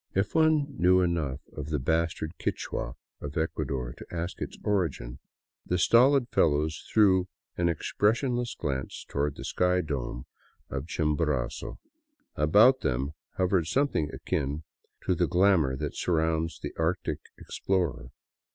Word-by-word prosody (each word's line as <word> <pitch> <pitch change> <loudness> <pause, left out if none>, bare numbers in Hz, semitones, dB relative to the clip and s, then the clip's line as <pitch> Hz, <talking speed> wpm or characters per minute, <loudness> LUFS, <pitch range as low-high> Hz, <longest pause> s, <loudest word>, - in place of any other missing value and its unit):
If 95 +2 0
one 155 -2 +4
knew 90 +1 +5
enough 80 -6 -1
of 75 -1 -5
the 75 - 0
bastard 80 +3 -1
Quichua 60 -1 -3 0.3
of 75 +1 -6
Ecuador 65 -6 -2
to - - -11
ask 85 +1 -4
its - - -5
origin, 75 -11 -1 0.4
the 90 - -1
stolid 125 +7 +5
fellows 75 +1 +1
threw 95 -4 +4 0.3
an 85 -1 +1
ex 85 - -3
pressionless 120 +3 +1
glance 65 -4 -4
toward 70 0 -1
the - - -8
icy 90 0 +3
dome 65 -5 -4 0.5
of 70 +2 -4
Chimborazo. 75 -5 -1 0.6
About 105 - +5
them 65 +4 -1 0.3
hovered 90 -3 +2
something 130 - +1
akin 70 +3 -2 0.4
to - - +2
the 85 0 +1
glamour 90 -5 +3
that - - -4
surrounds 80 -1 0
the - - -6
Arctic 85 +3 0 0.2
ex - - -8
plorer. 95 -4 0
80 Hz, 135 wpm, -28 LUFS, 75-95 Hz, 0.6 s, knew